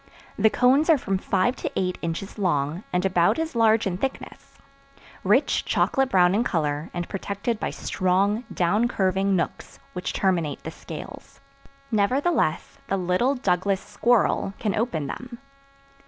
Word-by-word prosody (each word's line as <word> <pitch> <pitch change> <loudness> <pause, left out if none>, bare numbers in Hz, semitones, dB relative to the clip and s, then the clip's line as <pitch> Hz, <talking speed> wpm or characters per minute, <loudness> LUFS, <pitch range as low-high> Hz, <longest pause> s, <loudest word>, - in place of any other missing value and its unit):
The 220 - +4
cones 260 +8 +3
are 320 - +7
from 195 -7 -2
five 200 +7 +1
to - - -4
eight 180 -1 -1
inches 170 +5 -5
long 165 -1 0
and 180 +1 0
about 175 - +3
as 320 -4 -3
large 225 -1 +4
in 185 -2 -2
thickness; 270 +3 -6 0.7
rich - - +2
chocolate 270 -1 +1
brown 180 -3 +4
in 220 +4 +2
color 150 -8 -1
and 175 -1 -4
protected 200 +3 -3
by - - -2
strong, 195 +5 0
down 205 +7 +2
curving 195 -2 +1
nooks 170 - -3 0.2
which 180 0 -3
terminate 170 -6 0
the - - -5
scales. - - -10 0.5
Nevertheless 225 - +1
the 195 - 0
little 185 +9 +1
Douglas 190 -4 0
Squirrel 230 -4 +1
can 210 -3 -1
open 210 - -1
them. 240 - -7
195 Hz, 145 wpm, -24 LUFS, 180-235 Hz, 0.7 s, are